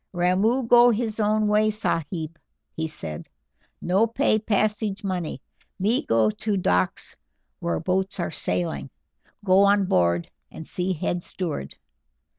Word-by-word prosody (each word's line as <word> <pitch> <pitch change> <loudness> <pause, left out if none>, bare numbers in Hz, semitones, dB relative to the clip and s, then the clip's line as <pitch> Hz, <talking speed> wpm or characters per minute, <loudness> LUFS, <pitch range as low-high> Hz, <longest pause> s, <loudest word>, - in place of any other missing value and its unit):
"Ramoo 190 +8 +2
go 240 +1 +6
his 225 -1 -1
own 215 0 +2
way, 210 +1 +3
sahib," 165 -5 -3 0.4
he 160 0 -2
said. 80 - -6 0.5
"No 195 +6 +3
pay 230 -1 +1
passage 210 -1 -1
money; 180 -8 -3 0.3
me 215 +7 +1
go 110 -1 +2
to 210 - -2
docks 90 - 0 0.4
where 85 -1 -1
boats 190 - -1
are 175 - -2
sailing, 85 - -2 0.6
go 185 0 +5
on 200 0 +4
board 85 - +1 0.2
and 160 - -9
see 180 +3 -2
head 175 +1 -2
steward. 160 - -5
185 Hz, 130 wpm, -24 LUFS, 155-215 Hz, 0.6 s, go